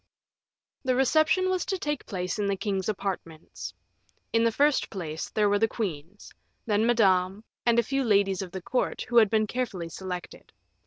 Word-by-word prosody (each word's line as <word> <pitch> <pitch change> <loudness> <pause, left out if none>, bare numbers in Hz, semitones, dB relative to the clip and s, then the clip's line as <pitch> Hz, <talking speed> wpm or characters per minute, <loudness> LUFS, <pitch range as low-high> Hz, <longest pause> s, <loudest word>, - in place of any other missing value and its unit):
The 255 -2 +1
reception 315 +8 +3
was 370 -1 0
to 385 - -1
take 295 -5 -3
place 185 0 -3
in 205 - 0
the 200 - +1
king's 195 -1 -2
apartments. 185 -6 -5 0.6
In 230 0 +4
the 230 - +3
first 290 +4 +2
place, 160 -5 -5
there 210 -1 +2
were 205 0 +2
the 225 - +3
queens, 190 -4 -5 0.3
then 215 +1 +2
Madame, 195 -3 +3 0.2
and 235 0 +4
a 235 - +5
few 275 +3 -1
ladies 200 -4 +2
of 185 -2 -6
the 190 -1 -6
court, 255 - -1
who 240 - +2
had 220 -3 +7
been 215 0 +2
carefully 210 -8 -3
selected. 180 +1 -7
210 Hz, 175 wpm, -27 LUFS, 190-240 Hz, 0.6 s, had